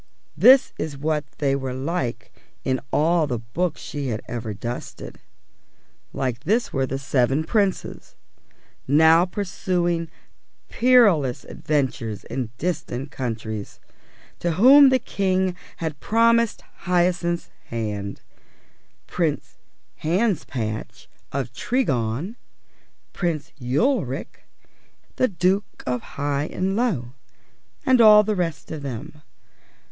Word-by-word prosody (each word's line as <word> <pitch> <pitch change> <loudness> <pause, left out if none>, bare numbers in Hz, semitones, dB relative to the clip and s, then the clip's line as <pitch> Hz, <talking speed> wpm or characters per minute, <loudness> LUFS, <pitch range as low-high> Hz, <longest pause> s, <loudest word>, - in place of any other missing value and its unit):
This 260 +1 +6
is 150 -3 -4
what 150 +1 -1
they 140 -2 +1
were 130 -2 -3
like 135 -2 -3 0.3
in 130 -1 0
all 165 +1 +2
the 125 -4 -2
books 150 +9 -3
she 145 -2 -5
had 110 -4 -2
ever 115 -2 -4
dusted; 115 +4 -7 0.9
like 125 -3 -2
this 225 +5 0
were 135 -1 0
the 135 - -3
seven 135 +1 +1
Princes 195 +2 -1 0.7
(now 160 +4 +6
pursuing 175 -3 -1 0.6
perilous 205 - +4
adventures 125 -8 -2
in 125 -3 -4
distant 145 -5 -3
countries) 110 -4 -5 0.6
to 170 -1 0
whom 270 - +8
the 260 - +4
King 190 -5 0 0.2
had 160 -3 -4
promised 230 0 +2 0.2
Hyacinth's 175 -1 +1
hand 105 -3 -4 0.8
Prince - - -2 0.4
Hanspatch 155 - -2 0.2
of 130 -3 -3
Tregong, 145 - -1 0.8
Prince 160 -6 -2
Ulric, 140 - -1 0.7
the 255 - +3
Duke 190 +1 -1
of 125 -2 -1 0.2
Highanlow, 145 - -1 0.7
and 255 -2 +5
all 210 -1 +8
the 215 0 -1
rest 165 -5 -3
of 155 -2 -5
them. 140 +3 -7
155 Hz, 100 wpm, -23 LUFS, 130-185 Hz, 0.9 s, whom